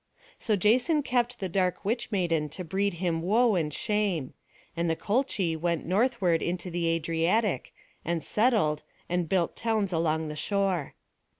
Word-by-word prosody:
So 220 - +1
Jason 250 - +3
kept 245 -2 0
the 190 - -2
dark 180 0 -1
witch 235 +4 -1
maiden 165 -6 0
to 185 - -4
breed 190 +3 -1
him 170 -2 -1
woe 220 +6 +3
and 160 -5 0
shame; 195 -6 -1 0.4
and 170 0 0
the 160 - +1
Colchi 205 -5 0
went 170 0 -1
northward 190 -3 +2
into 180 +1 -3
the 170 0 -1
Adriatic, 165 - 0 0.3
and 170 -1 -2
settled, 210 -10 +2 0.3
and 175 -2 -1
built 180 -3 +1
towns 220 -5 0
along 160 -1 0
the 150 - -5
shore. 190 -3 -1
180 Hz, 155 wpm, -28 LUFS, 165-215 Hz, 0.4 s, Jason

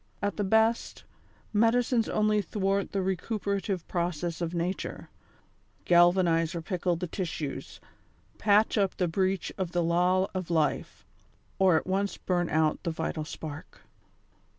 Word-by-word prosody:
At 200 -1 -2
the 205 - -1
best, 220 +3 +1 0.5
medicines 230 +2 +2
only 215 0 +2
thwart 195 -1 -1
the 195 - -1
recupera 200 +2 -2
tive 190 -4 -3
process 175 -1 -2
of 170 -1 -1
nature; 175 +3 -3 0.8
galvanize 175 -1 +4
or 170 - -3
pickle 180 -1 -1
the 175 +2 -3
tissues; 165 -5 -5 0.6
patch 210 +1 +3
up 195 -2 0
the 180 - +1
breach 190 +2 0
of 180 -2 -2
the 175 -1 +1
law 180 +3 +2
of 185 -3 -4
life, 155 -5 -1 0.5
or 185 -4 +5
at - - -2
once 195 +2 -1
burn 175 -2 -1
out 155 -1 +1
the 175 - -2
vital 160 -1 -3
spark. 155 -1 -8
185 Hz, 140 wpm, -28 LUFS, 170-200 Hz, 0.8 s, or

